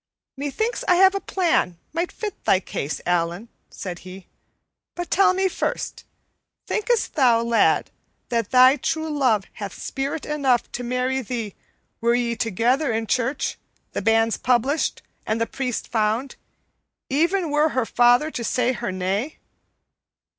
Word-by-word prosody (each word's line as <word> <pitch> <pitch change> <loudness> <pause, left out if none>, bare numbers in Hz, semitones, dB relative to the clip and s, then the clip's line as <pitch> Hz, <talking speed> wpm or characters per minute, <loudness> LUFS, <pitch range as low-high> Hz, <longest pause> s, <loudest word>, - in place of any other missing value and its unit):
"Methinks 290 - -2
I 360 - +5
have 380 +2 +6
a 395 - -1
plan 330 - 0 0.2
might 340 +2 -1
fit 420 -3 -6
thy 190 - +4
case, 150 -5 -4
Allan," 175 +5 -1 0.2
said 180 -2 -7
he. 185 0 -11 0.7
"But 350 0 -5
tell 390 0 +4
me 380 0 +2
first, 370 - -3 0.6
thinkest 450 +1 0
thou, 240 -6 +4
lad, 235 0 +2 0.4
that 230 -4 -1
thy 255 +2 +6
true 315 +1 -2
love 235 -8 +2 0.2
hath 200 -2 -6
spirit 275 +3 -3
enough 275 -5 +1
to 245 - -5
marry 250 +2 -1
thee 230 -4 -4 0.5
were 235 +1 +2
ye 240 -1 0
together 240 - +1
in 225 0 -1
church, 255 +4 -1 0.3
the - - -3
banns 225 +1 +2
published, 255 +5 +1 0.2
and 220 +1 0
the 230 - +1
priest 250 -1 -3
found, 225 +4 0 0.7
even 335 +4 +1
were 300 +2 +3
her 255 -5 0
father 245 +6 +4
to 240 - -4
say 250 +1 +1
her 235 -5 -3
nay?" 195 +10 -2
250 Hz, 145 wpm, -23 LUFS, 225-300 Hz, 0.7 s, have